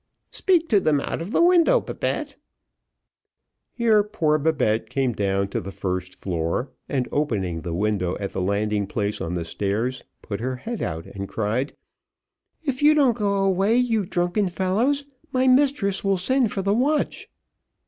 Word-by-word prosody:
"Speak 350 -4 +2
to 210 - +5
them 150 -5 +2
out 140 - -3
of 175 +5 -5
the 340 - +3
window, 360 +8 +5
Babette." - - -3 1.4
Here 225 -3 +3
poor 165 -8 0
Babette 145 -8 +1
came 130 -3 0
down 100 -1 0
to - - -2
the 95 - -7
first 90 -1 -4
floor, 90 - -2 0.2
and 130 -3 -1
opening 100 - -1
the 85 -1 -4
window 95 -2 0
at 100 -1 -4
the - - -2
landing 100 +1 0
place 105 0 -2
on 85 +2 -3
the 85 -2 -3
stairs, 110 +8 -2 0.2
put 100 -3 -4
her 130 +3 -2
head 225 - -5
out 80 -1 -3
and 100 0 -7
cried, 115 +6 -2 0.9
"If 275 -3 -2
you 300 +1 +6
don't 270 -6 +4
go 200 -3 0
away, 195 +3 +2
you 230 -4 +2
drunken 180 +3 0
fellows, 220 +11 0 0.3
my 260 0 +2
mistress 255 -7 +3
will 195 -1 +2
send 245 +4 +1
for 195 - -2
the 200 +1 +2
watch." 280 +7 0
155 Hz, 165 wpm, -24 LUFS, -, 1.4 s, you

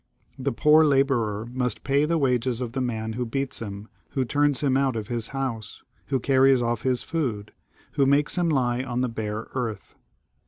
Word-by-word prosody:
The 135 +1 -1
poor 150 +6 +5
labourer 135 -7 +1
must 125 -1 -2
pay 140 +1 +2
the 165 +2 +1
wages 125 -4 +1
of 125 -3 -3
the 130 +1 -2
man 110 -3 -2
who 125 +2 -2
beats 135 +3 -3
him, 100 -1 -7 0.3
who 130 - 0
turns 145 +1 +1
him 135 -3 +2
out 135 -2 +1
of 110 -2 -4
his 115 -2 -1
house, 130 -6 -5 0.2
who 135 -2 0
carries 135 +1 +4
off 120 -2 -1
his 125 0 0
food, 125 -11 -3 0.4
who 140 -2 +2
makes 145 +2 +2
him 175 -2 +1
lie 125 -4 +1
on 125 -1 -2
the 130 - 0
bare 110 -1 -4
earth. 120 -5 -4
130 Hz, 190 wpm, -25 LUFS, 115-140 Hz, 0.4 s, poor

